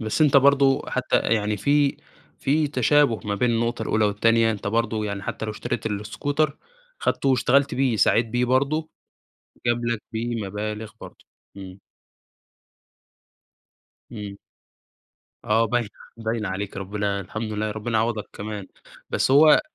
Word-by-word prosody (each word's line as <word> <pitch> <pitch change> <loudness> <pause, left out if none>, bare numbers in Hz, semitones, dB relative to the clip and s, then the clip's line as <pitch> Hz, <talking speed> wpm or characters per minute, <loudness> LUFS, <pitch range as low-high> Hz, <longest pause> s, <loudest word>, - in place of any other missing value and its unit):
بس 110 +7 -2
أنتَ 145 -2 +5
برضه 140 0 +4
حتى 130 0 0
يعني 105 -2 0
في 140 +6 +2 0.4
في 150 +2 +1
تشابه 140 -2 +3
ما 100 -1 -1
بين 120 +4 +1
النقطة 115 +1 -1
الأولى 110 0 +1
والتانية، 115 +2 +3
أنتَ 105 -2 -5
برضو 110 0 0
يعني 100 -1 -4
حتى 105 - -4
لو 110 - -3
اشتريت 110 +1 -4
الإسكوتر، 140 +8 -2 0.4
خدته 135 - 0
واشتغلت 135 +2 +3
بيه 130 -4 +1
سعيت 115 +3 +3
بيه 120 +2 0
برضو 140 +5 0 0.8
جاب 120 0 +1
لَك 115 -2 -1
بيه 115 -1 -3
مبالغ 105 +2 -5
برضه. - - -12 0.3
امم. 95 0 -10 2.3
امم. 105 -3 -7 1.1
آه 110 +2 +3
باينة 115 -1 0 0.3
باينة 110 -2 -2
عليك 95 +1 -4
ربنا 100 0 -2
الحمد 110 +4 -5
لله 105 0 -2
ربنا 110 +1 -2
يعوضك 110 -2 -1
كمان. 105 -2 -6 0.4
بس - - +1
هو 150 +3 +7
آآ - - +6
115 Hz, 140 wpm, -24 LUFS, 105-130 Hz, 2.3 s, هو